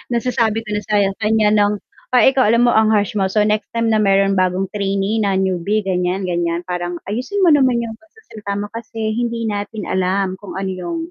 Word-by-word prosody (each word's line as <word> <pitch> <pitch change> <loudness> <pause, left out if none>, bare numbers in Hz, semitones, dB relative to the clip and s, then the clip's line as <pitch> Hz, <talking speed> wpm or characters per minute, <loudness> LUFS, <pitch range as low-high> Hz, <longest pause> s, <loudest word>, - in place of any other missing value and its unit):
nasasabi 230 -2 0
ko 215 - -21
na 210 0 -1
sa 210 - 0 0.2
kanya 215 -1 +2
ng, 205 -1 +3 0.4
ah, 240 - +6
"Ikaw 265 -3 +4
alam 235 +2 +4
mo 240 - +4
ang 220 -1 +4
harsh 205 -2 +2
mo, 190 - +2
so, 210 +2 +1
next 210 0 0
time 230 -1 +1
na 215 - +3
mayron 195 -1 +3
bagong 185 +1 0
trainee 200 +1 -1
na 200 -2 +1
newbie 190 +2 0
ganyian, 185 0 -1
ganiyan 175 -1 -1
parang 175 0 -4 0.2
ayusin 265 - -2
mo 345 - +6
naman 255 -5 +3
yung 225 -1 -7
pagsasalita 320 - -8
mo 205 +1 -4
kasi 225 -1 -4
hindi 235 -1 -2
natin 210 0 -4
alam, 185 +1 -1
kung 205 - -9
ano 190 0 -3
yung, 190 - -4
210 Hz, 205 wpm, -18 LUFS, 190-225 Hz, 0.4 s, ah